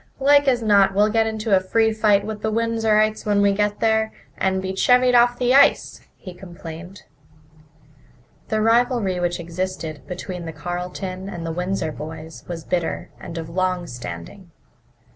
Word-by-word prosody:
"Like 285 Hz, +1 st, +4 dB
as 245 Hz, -3 st, +2 dB
not 200 Hz, -3 st, +4 dB
we'll 210 Hz, +1 st, +3 dB
get 225 Hz, 0 st, +2 dB
into 220 Hz, -1 st, 0 dB
a -, -, +4 dB
free 220 Hz, +4 st, +1 dB
fight 210 Hz, -2 st, +2 dB
with 215 Hz, -1 st, -6 dB
the 220 Hz, -, -1 dB
Windsorites 220 Hz, -1 st, +1 dB
when 205 Hz, -1 st, +1 dB
we 200 Hz, 0 st, +3 dB
get 210 Hz, +1 st, -1 dB
there, 220 Hz, -1 st, +2 dB, 0.2 s
and 190 Hz, 0 st, 0 dB
be 190 Hz, 0 st, -4 dB
chevied 250 Hz, +4 st, +4 dB
off 240 Hz, 0 st, +4 dB
the 250 Hz, 0 st, +2 dB
ice," 275 Hz, -, +4 dB, 0.2 s
he 185 Hz, -, -10 dB
complained. 175 Hz, 0 st, -10 dB, 1.4 s
The 215 Hz, 0 st, 0 dB
rivalry 225 Hz, -4 st, +2 dB
which 175 Hz, 0 st, -1 dB
existed 170 Hz, -2 st, -5 dB
between 180 Hz, -1 st, -6 dB
the 160 Hz, -, -6 dB
Carleton 180 Hz, +4 st, -5 dB
and 170 Hz, -3 st, -6 dB
the 165 Hz, -, -3 dB
Windsor 180 Hz, -1 st, -2 dB
boys 160 Hz, +2 st, -9 dB
was 170 Hz, -2 st, -6 dB
bitter 175 Hz, -1 st, -3 dB
and 170 Hz, -1 st, -8 dB
of 165 Hz, -1 st, -5 dB
long 185 Hz, +1 st, -1 dB
standing. 120 Hz, -, -9 dB
195 Hz, 160 wpm, -22 LUFS, 175-220 Hz, 1.4 s, Like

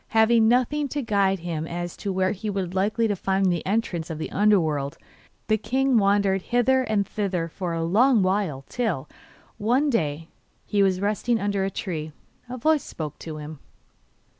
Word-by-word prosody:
Having 220 Hz, 0 st, +5 dB
nothing 255 Hz, +5 st, +2 dB
to 285 Hz, +1 st, -3 dB
guide 195 Hz, -4 st, +1 dB
him 165 Hz, -2 st, -3 dB
as 175 Hz, 0 st, -5 dB
to 200 Hz, -, -3 dB
where 185 Hz, 0 st, +1 dB
he 210 Hz, +1 st, -4 dB
was 190 Hz, -3 st, -3 dB
likely 215 Hz, +4 st, +1 dB
to 205 Hz, -, 0 dB
find 190 Hz, 0 st, +1 dB
the 170 Hz, -2 st, -2 dB
entrance 190 Hz, -6 st, -1 dB
of 160 Hz, -, -4 dB
the 155 Hz, -, -5 dB
under 210 Hz, 0 st, +4 dB
world, 145 Hz, -4 st, -2 dB, 0.5 s
the 215 Hz, -1 st, +1 dB
king 265 Hz, +3 st, +1 dB
wandered 200 Hz, -1 st, +2 dB
hither 245 Hz, +5 st, +2 dB
and 215 Hz, -5 st, 0 dB
thither 190 Hz, -5 st, -2 dB
for 175 Hz, +1 st, -4 dB
a 165 Hz, -, -1 dB
long 220 Hz, +6 st, +4 dB
while, 185 Hz, -8 st, -1 dB
till, 205 Hz, -, -2 dB, 0.5 s
one 255 Hz, +7 st, +2 dB
day, 150 Hz, -, 0 dB
while 165 Hz, -, -17 dB, 0.4 s
he 205 Hz, -2 st, +1 dB
was 190 Hz, -2 st, +2 dB
resting 215 Hz, +3 st, 0 dB
under 200 Hz, -1 st, 0 dB
a 195 Hz, -, 0 dB
tree, 160 Hz, -5 st, -4 dB, 0.4 s
a 255 Hz, -, -5 dB
voice 310 Hz, +4 st, +2 dB
spoke 150 Hz, -2 st, -7 dB
to 160 Hz, -2 st, -7 dB
him. 150 Hz, 0 st, -8 dB
195 Hz, 185 wpm, -24 LUFS, 170-225 Hz, 0.5 s, Having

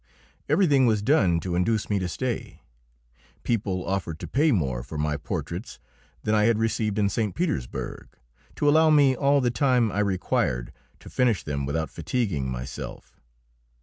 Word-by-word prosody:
Everything 145 Hz, -5 st, +4 dB
was 105 Hz, -3 st, +1 dB
done 95 Hz, -, +3 dB
to 90 Hz, +1 st, -3 dB
induce 100 Hz, +5 st, +1 dB
me 100 Hz, -1 st, 0 dB
to 90 Hz, -, -2 dB
stay. 125 Hz, +5 st, -4 dB, 0.8 s
People 100 Hz, -5 st, -1 dB
offered 85 Hz, -4 st, -2 dB
to -, -, -7 dB
pay 150 Hz, +3 st, +2 dB
more 65 Hz, -, 0 dB
for 65 Hz, +5 st, -8 dB
my 75 Hz, 0 st, 0 dB
portraits 85 Hz, -, -5 dB, 0.5 s
than 105 Hz, -, 0 dB
I 105 Hz, -1 st, +4 dB
had 115 Hz, -1 st, +3 dB
received 110 Hz, -2 st, 0 dB
in 105 Hz, -1 st, +3 dB
St. 105 Hz, 0 st, -1 dB
Petersburg 155 Hz, -, -3 dB, 0.5 s
to 145 Hz, -, 0 dB
allow 160 Hz, +2 st, +5 dB
me 145 Hz, -3 st, +5 dB
all 140 Hz, +2 st, +3 dB
the 120 Hz, -1 st, +1 dB
time 125 Hz, -4 st, +2 dB
I 100 Hz, -, -2 dB
required 90 Hz, -11 st, 0 dB, 0.3 s
to -, -, -11 dB
finish 120 Hz, -6 st, +1 dB
them 70 Hz, -2 st, -3 dB
without 80 Hz, +2 st, -2 dB
fatiguing 85 Hz, -, -2 dB
myself. 65 Hz, +1 st, -7 dB
105 Hz, 160 wpm, -25 LUFS, 80-125 Hz, 0.8 s, allow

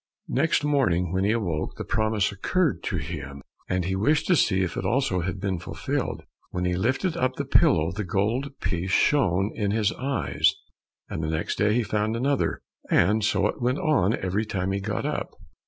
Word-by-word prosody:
Next 145 Hz, +2 st, +2 dB
morning, 110 Hz, -, +1 dB
when 95 Hz, +1 st, +1 dB
he 105 Hz, -, +3 dB
awoke, 90 Hz, -9 st, -2 dB
the -, -, -6 dB
promise 110 Hz, -2 st, +1 dB
occurred 155 Hz, -, 0 dB
to 90 Hz, -, -1 dB
him, 70 Hz, -3 st, -6 dB, 0.3 s
and 90 Hz, -1 st, 0 dB
he 95 Hz, +1 st, -1 dB
wished 145 Hz, +10 st, +2 dB
to 180 Hz, -, +6 dB
see 95 Hz, -, +3 dB
if 90 Hz, -, -3 dB
it -, -, -3 dB
also 105 Hz, -1 st, +1 dB
had 90 Hz, +1 st, -3 dB
been 95 Hz, -2 st, -2 dB
fulfilled. -, -, -3 dB, 0.3 s
When 90 Hz, 0 st, -2 dB
he 90 Hz, 0 st, +1 dB
lifted 130 Hz, -, 0 dB
up 130 Hz, -6 st, 0 dB
the 140 Hz, -, -3 dB
pillow, 85 Hz, -, +3 dB
the 105 Hz, +3 st, -3 dB
gold 105 Hz, +9 st, 0 dB
piece 90 Hz, 0 st, -2 dB
shone 95 Hz, -4 st, +2 dB
in 105 Hz, -3 st, -1 dB
his 105 Hz, 0 st, +1 dB
eyes, 135 Hz, -1 st, 0 dB, 0.5 s
and -, -, -4 dB
next 80 Hz, +1 st, -2 dB
day 105 Hz, +1 st, +3 dB
he 120 Hz, -, +2 dB
found 105 Hz, +1 st, -1 dB
another, 135 Hz, +3 st, 0 dB, 0.3 s
and 105 Hz, +2 st, +3 dB
so 100 Hz, -1 st, +2 dB
it 105 Hz, -, -2 dB
went 125 Hz, +3 st, +1 dB
on, 115 Hz, -, +2 dB
every 95 Hz, +3 st, -1 dB
time 95 Hz, -3 st, -2 dB
he 100 Hz, -, -1 dB
got 105 Hz, +1 st, -3 dB
up. -, -, -3 dB
100 Hz, 190 wpm, -25 LUFS, 90-120 Hz, 0.5 s, to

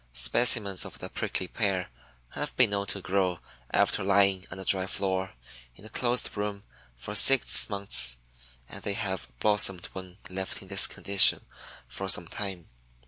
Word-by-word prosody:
Specimens 100 Hz, -, +3 dB
of -, -, -10 dB
the -, -, -8 dB
Prickly 95 Hz, -, -3 dB
Pear 95 Hz, -, -3 dB, 0.4 s
have -, -, -6 dB
been -, -, +2 dB
known 100 Hz, 0 st, -3 dB
to 100 Hz, -2 st, -2 dB
grow 95 Hz, -2 st, -1 dB, 0.3 s
after -, -, 0 dB
lying 100 Hz, -1 st, +1 dB
on -, -, -9 dB
a 95 Hz, -, -7 dB
dry 95 Hz, 0 st, +3 dB
floor, 95 Hz, -2 st, -3 dB, 0.4 s
in 100 Hz, -, -15 dB
a -, -, -9 dB
closed 125 Hz, +1 st, -1 dB
room, 105 Hz, -1 st, -5 dB, 0.3 s
for 65 Hz, +13 st, -8 dB
six 130 Hz, +4 st, +6 dB
months 100 Hz, -, +1 dB, 0.5 s
and -, -, -10 dB
they 100 Hz, -, -3 dB
have 95 Hz, -2 st, -5 dB
blossomed 100 Hz, -4 st, +2 dB
when 95 Hz, -1 st, -10 dB
left 95 Hz, 0 st, -5 dB
in 95 Hz, -, -16 dB
this 95 Hz, 0 st, +5 dB
condition 100 Hz, -1 st, +2 dB, 0.4 s
for 95 Hz, 0 st, -6 dB
some 90 Hz, -2 st, +4 dB
time. 95 Hz, -4 st, -6 dB
95 Hz, 160 wpm, -27 LUFS, 95-100 Hz, 0.5 s, six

